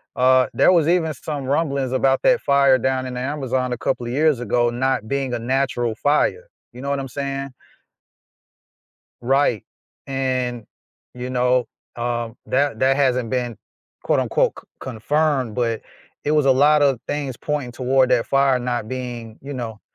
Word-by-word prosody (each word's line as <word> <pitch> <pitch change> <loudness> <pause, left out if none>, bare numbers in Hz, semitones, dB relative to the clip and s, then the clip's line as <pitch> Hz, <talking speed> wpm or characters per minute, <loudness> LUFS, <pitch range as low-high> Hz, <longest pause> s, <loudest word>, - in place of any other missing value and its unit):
uh, 130 0 +4
there - - +5
was 165 -4 +3
even 165 -3 +2
some 140 +1 -5
rumblings 140 -2 0
about 135 +1 +2
that 250 -2 +4
fire 140 -2 +4
down 130 +1 -1
in 125 -1 -5
the - - -3
Amazon 130 -2 -2
a - - -4
couple 125 0 -2
of 120 - -4
years 150 -3 +2
ago 120 +1 +1
not 125 -2 -1
being 135 0 -2
a 120 - -1
natural 120 -2 -1
fire, 150 - +1 0.2
you 125 +2 -11
know 140 - -4
what 140 -1 0
I'm 135 - -4
saying? 140 +1 -4 1.7
Right, 130 -3 +1 0.4
and, 130 -3 -2 0.5
you 125 +1 -5
know, 125 0 +2 0.3
um, 120 -1 -3
that 140 -3 0
that 135 +2 +3
hasn't 125 -4 +1
been 120 -3 -2 0.5
quote, - - +2
unquote, - - +1
"c - - -27 0.2
confirmed," 130 0 0
but 115 -2 -1 0.4
it 145 - 0
was 150 -2 +3
a 135 - +6
lot 145 +3 +4
of 135 -4 +2
things 145 -4 -3
pointing 145 -4 -3
toward 130 +1 +2
that 120 -2 +2
fire 135 -1 +3
not 120 -3 -2
being, 120 -3 -6
you 140 +1 -7
know 115 -4 -6
130 Hz, 170 wpm, -21 LUFS, 120-140 Hz, 1.7 s, a